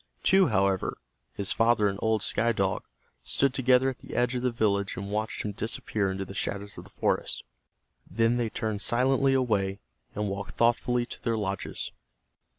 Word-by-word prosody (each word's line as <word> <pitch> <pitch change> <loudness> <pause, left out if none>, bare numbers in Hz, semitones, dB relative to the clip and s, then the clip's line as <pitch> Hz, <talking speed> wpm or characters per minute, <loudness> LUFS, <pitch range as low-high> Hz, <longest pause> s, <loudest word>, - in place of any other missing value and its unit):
Two, 190 -1 +5
however, 95 -3 +1 0.4
his 100 - 0
father 115 -2 +3
and 100 0 -2
old 110 -2 +1
Sky 120 +1 +1
Dog, 95 -2 -1 0.4
stood 135 - +2
together 130 0 +4
at 130 - -12
the - - -9
edge 120 0 +2
of 125 - -1
the 125 - +2
village 100 -4 0
and 100 +1 -5
watched 110 +1 -2
him 105 - -2
disappear 105 -1 -2
into 95 +1 -3
the 95 - -9
shadows 100 +1 -3
of - - -11
the - - -15
forest. - - -1 0.7
Then 115 +4 +2
they 120 -2 0
turned 110 -2 -3
silently 135 +4 +3
away, 100 -6 +1 0.4
and 105 0 -1
walked 100 +1 -5
thoughtfully 120 +1 +2
to - - -7
their 115 -2 0
lodges. 95 -3 -3
110 Hz, 175 wpm, -28 LUFS, 100-120 Hz, 0.7 s, Two